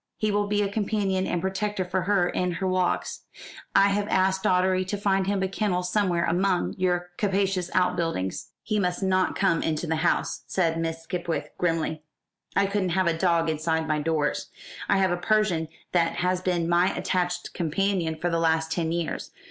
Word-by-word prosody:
He 215 -1 0
will 205 0 +1
be 205 0 +1
a - - +1
companion 200 -2 0
and 175 - 0
protector 190 0 -1
for 180 +1 -1
her 185 -1 +2
in 180 0 -1
her 190 +3 -2
walks. 185 -1 -1 0.5
I 195 +1 +6
have 205 +1 0
asked 190 0 +2
Doddery 185 0 +2
to 205 +2 -3
find 195 -1 +1
him 200 -1 0
a - - +1
kennel 190 -2 -1
somewhere 180 -2 +1
among 180 +1 +1
your 180 -1 0
capacious 195 -3 0
outbuildings." 165 - 0
"He 215 -1 0
must 180 0 -1
not 185 -1 +2
come 185 -5 +2
into 160 +1 -1
the 160 -1 -1
house," 170 +2 0
said 165 -3 0
Miss 165 0 -3
Skipwith 170 0 -3
grimly; 165 -2 0 0.5
"I 200 - +4
couldn't 195 -3 -1
have 185 - +3
a 170 -1 +2
dog 170 -1 +2
inside 160 0 0
my 155 0 +1
doors. 155 -1 -1 0.4
I - - +4
have 190 -2 +2
a 175 - 0
Persian 185 -4 +1 0.2
that 170 -2 +2
has 180 0 0
been 175 -2 0
my 175 +2 +3
attached 180 -1 -1
companion 175 0 0
for 170 +2 -2
the 165 - +1
last 160 -1 +1
ten 165 -1 -1
years. 170 -1 -3
180 Hz, 185 wpm, -26 LUFS, 165-195 Hz, 0.5 s, I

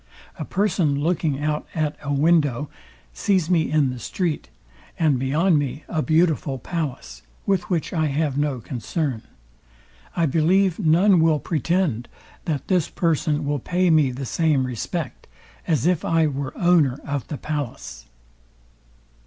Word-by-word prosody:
A - - -3
person 180 -7 +1
looking 155 -2 0
out 150 0 -1
at 155 -2 0
a 145 - -4
window, 145 -2 +2 0.4
sees 185 -4 +1
me 165 -3 +2
in 150 -4 +2
the 125 - -7
street, 165 - -3 0.5
and 150 -6 +2
beyond 150 +6 +2
me 145 +1 -4
a 160 - -1
beautiful 155 -4 +1
palace, 130 - -5 0.2
with 185 -3 0
which 170 -4 -1
I 160 -3 +1
have 145 -1 -1
no 145 -3 0
concern: 130 +1 -3 0.9
I 170 - +2
believe 175 +5 +2
none 180 +2 +4
will 160 -1 +4
pretend, 160 - -1 0.4
that 145 -5 -2
this 180 -5 +1
person 155 -3 0
will 145 0 -1
pay 180 +6 +1
me 155 -4 +4
the 130 +2 -5
same 150 -1 +1
respect, 130 +4 -5 0.4
as 155 -6 +1
if 175 -2 +2
I 165 -1 +2
were 140 -2 -3
owner 165 -7 +3
of 145 -3 -3
the 150 - -5
palace. 140 - -5
155 Hz, 145 wpm, -23 LUFS, 140-170 Hz, 0.9 s, none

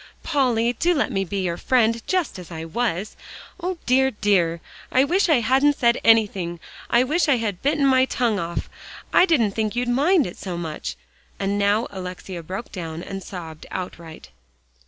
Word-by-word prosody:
Polly, 245 -6 +1
do 345 +8 +1
let 285 - 0
me 195 -4 0
be 195 +1 -3
your 170 -2 -2
friend 230 -1 +2
just 360 - -1
as 180 - -10
I 160 -2 -6
was. 200 +2 -2 0.4
O, 360 0 -3
dear, 265 +2 +4
dear! 190 -7 +1 0.3
I 260 - +4
wish 360 +6 +2
I 290 -7 +4
hadn't 270 +5 +3
said 235 0 +3
anything 200 -6 +3 0.3
I 240 +1 +4
wish 310 +5 +1
I 270 - +4
had 210 -6 -3
bitten 290 0 +2
my 260 -1 +5
tongue 235 -5 0
off; 170 -1 -3 0.5
I 365 - +6
didn't 245 - +3
think 215 +1 -2
you'd 245 0 -1
mind 295 +5 +3
it 175 - -7
so 180 -3 -5
much," 160 -3 -5 0.4
and 200 +1 -1
now 205 +3 +2
Alexia 185 -1 -7
broke 190 +8 -7
down, 165 -2 -6
and 195 -1 -6
sobbed 165 -4 -9
outright. 170 -3 -7
220 Hz, 175 wpm, -23 LUFS, 180-265 Hz, 0.5 s, I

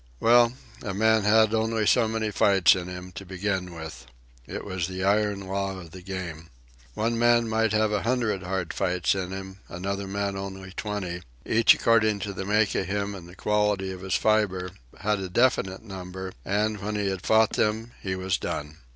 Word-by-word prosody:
Well, 120 0 +5 0.3
a 100 -4 -4
man 110 0 +3
had 110 +1 +5
only 110 0 +1
so 115 +1 +4
many 110 -1 -1
fights 95 -2 +5
in 90 -1 -4
him, 90 0 -7
to 95 +2 -8
begin 95 0 -3
with. 80 -6 -8 0.4
It - - -6
was 95 -4 -2
the 95 0 -4
iron 105 0 +2
law 95 0 -3
of 85 -3 -11
the 95 - -10
game. 90 -4 -6 0.5
One 115 +1 0
man 120 0 +4
might 110 0 +1
have 110 0 +2
a 105 -2 0
hundred 115 -5 0
hard 95 -1 -3
fights 90 -1 +1
in 95 -2 -3
him, 95 0 -7
another 100 +3 -4
man 100 0 -2
only 95 -1 -6
twenty; 95 -4 -4 0.2
each, 115 0 +5
according 110 -2 +3
to 100 +1 -3
the 95 0 -5
make 105 +1 +2
of 95 - -1
him 100 +1 -2
and 90 -3 -10
the 90 - -13
quality 105 -2 +1
of 95 -1 -8
his 95 -1 -1
fibre, 100 -4 +1 0.3
had 105 0 +1
a 95 -1 -4
definite 95 -3 +1
number, 95 -2 -7
and, 105 +1 0
when 105 +2 -3
he 105 -1 0
had 95 -1 -2
fought 110 0 +4
them, 110 +2 0
he 95 -1 -2
was 95 0 -1
done. 75 +1 -4
100 Hz, 195 wpm, -26 LUFS, 95-110 Hz, 0.5 s, Well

